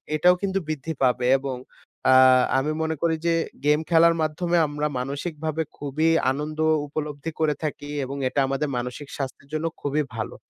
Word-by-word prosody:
এটাও 180 +4 +5
কিন্তু 195 -1 0
বৃদ্ধি 155 +1 -3
পাবে 125 -1 +2
এবং 135 -1 -4 0.6
আ - - +7 0.4
আমি 140 +3 0
মনে 160 0 -1
করি 165 -1 +2
যে 165 - +3 0.3
গেম 150 +1 +4
খেলার 165 0 +5
মাধ্যমে 170 +3 0
আমরা 150 +1 -2
মানসিকভাবে 155 +4 -3
খুবই 145 +3 0 0.2
আনন্দ 150 +3 -4 0.3
উপলব্ধি 150 +1 -4
করে 155 -2 +2
থাকি। 145 -1 -4 0.2
এবং 135 +2 -6
এটা 140 - -1
আমাদের 135 +2 -1
মানসিক 125 +4 -5
স্বাস্থ্যের 140 0 -6
জন্য 155 +1 -1 0.2
খুবই 145 +1 0
ভালো। 110 - -4
150 Hz, 160 wpm, -24 LUFS, 140-160 Hz, 0.6 s, আ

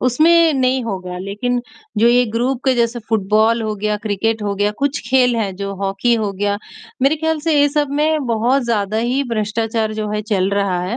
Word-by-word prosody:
उसमें 320 +6 +4
नहीं 260 -1 +1
होगा 185 -4 -5
लेकिन 210 +6 -2 0.4
जो 230 - +4
ये 245 +1 +4
ग्रुप 245 +2 -1
के 260 -1 +3
जैसे 235 0 0
फुटबॉल 220 +2 +2
हो 215 -1 -2
गया, 210 +1 -1
क्रिकेट 220 +1 -2
हो 205 -1 -1
गया, 205 +1 +1
कुछ 280 0 -1
खेल 250 -2 +4
हैं 205 -4 -2
जो 200 0 -4
हॉकी 195 +5 0
हो 215 -3 -1
गया 205 +1 -1 0.4
मेरे 275 +4 +3
ख़्याल 320 0 -1
से 315 -1 +1
ये 290 - +4
सब 290 -1 -1
में 305 -2 +1
बहुत 240 +4 +1
ज़्यादा 215 -3 -1
ही 245 +5 0
भ्रष्टाचार 220 0 -1
जो 215 -1 -3
है 210 - -1
चल 200 -3 0
रहा 200 -3 0
है 190 +6 -3
225 Hz, 205 wpm, -18 LUFS, 205-255 Hz, 0.4 s, उसमें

